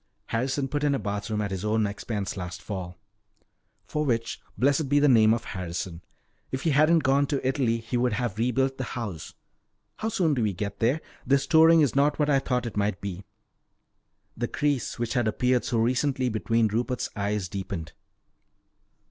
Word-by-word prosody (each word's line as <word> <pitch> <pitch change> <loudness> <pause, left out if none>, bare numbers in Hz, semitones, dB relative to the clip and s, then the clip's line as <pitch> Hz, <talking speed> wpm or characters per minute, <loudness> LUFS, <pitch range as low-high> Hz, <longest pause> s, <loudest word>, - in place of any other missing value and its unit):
"Harrison 135 +4 -1
put 145 +2 -2
in 145 -1 +3
a - - +1
bathroom 105 0 -3
at 100 -1 -3
his 95 0 -3
own 110 0 +1
expense 100 0 -4
last 90 -2 -6
fall." 90 -4 -6 0.9
"For 150 - -2
which 115 -5 -1 0.2
blessed 140 +2 +2
be 145 - +3
the 145 - +4
name 110 -5 +6
of 115 +1 +1
Harrison. 90 -1 -5 0.5
If 130 - -4
he 165 - +2
hadn't 155 +3 +4
gone 140 +1 +3
to 135 -3 -1
Italy, 130 -4 +1
he 115 +2 -3
would 120 -1 +1
have 110 -2 -2
rebuilt 130 +3 +1
the - - -1
house. 100 -10 -6 0.6
How 220 - -2
soon 180 -8 +1
do 125 - 0
we 105 -3 +1
get 100 +2 -5
there? 130 +8 +2 0.2
This 140 +2 +2
touring 160 0 +6
is 145 -3 +2
not 145 +2 +3
what 150 -1 +2
I 135 - +4
thought 125 -2 -1
it 115 - -5
might 100 -3 0
be 95 -1 -6 0.5
" - - -48
The 120 +1 -2
crease 145 -2 -1
which 120 -1 -2
had 120 -4 +1
appeared 125 +3 +1
so 120 - 0
recently 130 +3 +1
between 115 0 +1
Rupert's 120 +4 -2
eyes 100 -2 -1
deepened. 95 -4 -5
120 Hz, 185 wpm, -26 LUFS, 105-140 Hz, 0.9 s, name